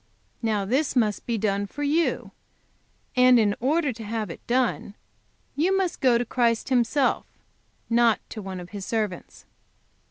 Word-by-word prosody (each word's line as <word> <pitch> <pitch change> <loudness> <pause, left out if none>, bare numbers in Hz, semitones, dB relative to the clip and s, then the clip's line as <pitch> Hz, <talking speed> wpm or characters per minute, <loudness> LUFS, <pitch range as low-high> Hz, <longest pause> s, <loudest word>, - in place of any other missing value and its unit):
Now 215 -3 0
this 265 +8 0
must 215 -4 0
be 235 -2 0
done 200 -1 -1
for 290 +8 -6
you; 315 +4 0 0.8
and 250 0 +6
in 210 -3 +3
order 290 +2 +1
to 225 0 -9
have 215 -3 -3
it - - -10
done 245 -4 0 0.6
you 365 +6 +2
must 375 -3 -1
go 250 -3 +4
to 240 - -1
Christ 235 0 0
Himself, 255 +2 +1 0.6
not 235 -1 +3
to 215 - -6
one 190 -2 -6
of 180 0 -10
His 200 -2 -6
servants. 210 -4 -4
235 Hz, 155 wpm, -25 LUFS, 210-260 Hz, 0.8 s, and